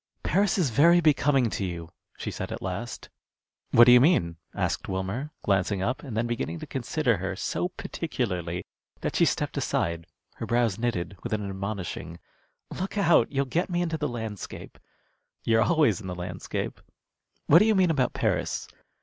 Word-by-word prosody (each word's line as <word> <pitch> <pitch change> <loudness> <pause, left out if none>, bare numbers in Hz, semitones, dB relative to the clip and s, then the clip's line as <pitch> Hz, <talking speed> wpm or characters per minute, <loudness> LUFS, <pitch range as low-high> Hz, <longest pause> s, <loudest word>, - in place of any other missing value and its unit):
"Paris 200 0 +2
is 160 -10 +1
very 170 +8 +6
becoming 145 -5 +3
to 105 - -3
you," 85 -2 -5 0.3
she - - -4
said - - -5
at - - -4
last. 95 +6 -5 0.6
"What 120 - +7
do 125 - +8
you 125 0 +8
mean?" 85 - +3 0.2
asked - - -2
Wilmer, 95 +9 -3
glancing 95 -1 +1
up, 125 +6 -1
and 125 -7 -6
then 115 - +1
beginning 115 -8 -3
to - - -7
consider - - 0
her - - -3
so - - -2
particularly 85 0 -3 0.4
that - - -2
she - - +5
stepped - - -1
aside, 85 0 -1 0.3
her - - -5
brows 115 -4 +1
knitted, 100 -5 -2
with 120 - -4
an 105 -2 -2
admonishing, 95 -4 -5 0.5
"Look 190 +3 -4
out! 170 -5 +4
you'll 140 0 +1
get 165 +9 -1
me 175 -1 0
into 165 -2 -2
the 150 - 0
landscape." 110 -4 -7 0.6
"You're 115 0 +3
always 150 - +3
in 95 - -8
the 90 - -4
landscape. 90 +1 -5 0.6
What 160 - +7
do 210 - +4
you 220 -1 +3
mean 185 -3 +4
about 135 -5 +1
Paris?" - - -1
115 Hz, 175 wpm, -27 LUFS, 95-150 Hz, 0.6 s, do